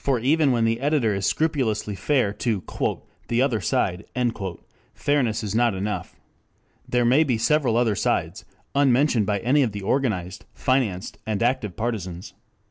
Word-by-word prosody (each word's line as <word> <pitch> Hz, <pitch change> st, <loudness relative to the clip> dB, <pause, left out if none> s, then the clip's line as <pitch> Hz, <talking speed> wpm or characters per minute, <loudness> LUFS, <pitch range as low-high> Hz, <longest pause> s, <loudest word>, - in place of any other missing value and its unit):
For 135 Hz, -2 st, +2 dB
even 140 Hz, +4 st, +2 dB
when 115 Hz, -2 st, +2 dB
the 115 Hz, +1 st, +1 dB
editor 140 Hz, -6 st, +1 dB
is 100 Hz, 0 st, -1 dB
scrupulously 130 Hz, -10 st, 0 dB
fair 105 Hz, 0 st, +1 dB
to 105 Hz, -3 st, -2 dB, 0.6 s
"the 120 Hz, -, 0 dB
other 120 Hz, -6 st, 0 dB
side," 90 Hz, 0 st, 0 dB, 0.9 s
fairness 125 Hz, -7 st, 0 dB
is 105 Hz, -2 st, -3 dB
not 115 Hz, -2 st, +2 dB
enough. 95 Hz, -1 st, -4 dB, 0.7 s
There 125 Hz, -1 st, +2 dB
may 130 Hz, +6 st, +5 dB
be 130 Hz, -7 st, 0 dB
several 125 Hz, 0 st, +2 dB
other 120 Hz, -3 st, +2 dB
sides, 90 Hz, +1 st, -1 dB, 0.3 s
unmentioned 135 Hz, -5 st, +3 dB
by 105 Hz, -1 st, +1 dB
any 135 Hz, +5 st, +3 dB
of 120 Hz, -6 st, 0 dB
the 100 Hz, -1 st, -6 dB
organized, 95 Hz, -7 st, -1 dB
financed 120 Hz, -9 st, -1 dB
and 110 Hz, 0 st, -1 dB
active 115 Hz, -7 st, 0 dB
partisans. 95 Hz, -7 st, -4 dB
115 Hz, 150 wpm, -24 LUFS, 105-135 Hz, 0.9 s, may